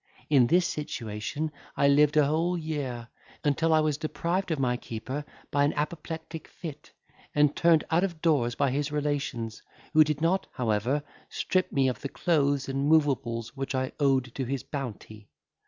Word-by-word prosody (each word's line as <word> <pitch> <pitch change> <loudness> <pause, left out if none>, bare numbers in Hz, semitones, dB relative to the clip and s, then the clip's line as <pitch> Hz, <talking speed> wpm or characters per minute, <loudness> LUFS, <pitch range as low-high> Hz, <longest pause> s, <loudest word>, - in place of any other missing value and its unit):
In 130 -5 +6
this 175 +6 +4
situation 145 +1 -3 0.3
I 140 - +4
lived 150 +1 +4
a 150 - +6
whole 165 +5 +1
year, 140 -7 -4 0.3
until 155 +3 +2
I 155 0 +5
was 150 -1 0
deprived 170 +4 -1
of 160 - 0
my 125 -2 +1
keeper 125 +5 -5 0.3
by 140 0 +3
an 145 - +2
apoplectic 160 +1 -4
fit, 155 -3 -9 0.4
and 150 0 +4
turned 165 -2 +4
out 165 +3 +3
of 175 -5 -2
doors 140 -8 +2
by 140 -2 +1
his 145 +2 -1
relations, 140 -7 -2 0.3
who 155 -1 +8
did 150 -2 -2
not, 170 +4 +1
however, 120 +4 0 0.3
strip 185 0 0
me 135 -1 +2
of 130 - -2
the 140 - -4
clothes 145 -5 +1
and 135 +2 0
moveables 130 -7 +1
which 135 0 -3
I 130 0 -1
owed 135 -4 +2
to 135 - -2
his 135 +1 -3
bounty. 110 -6 -7
145 Hz, 170 wpm, -28 LUFS, 130-155 Hz, 0.4 s, who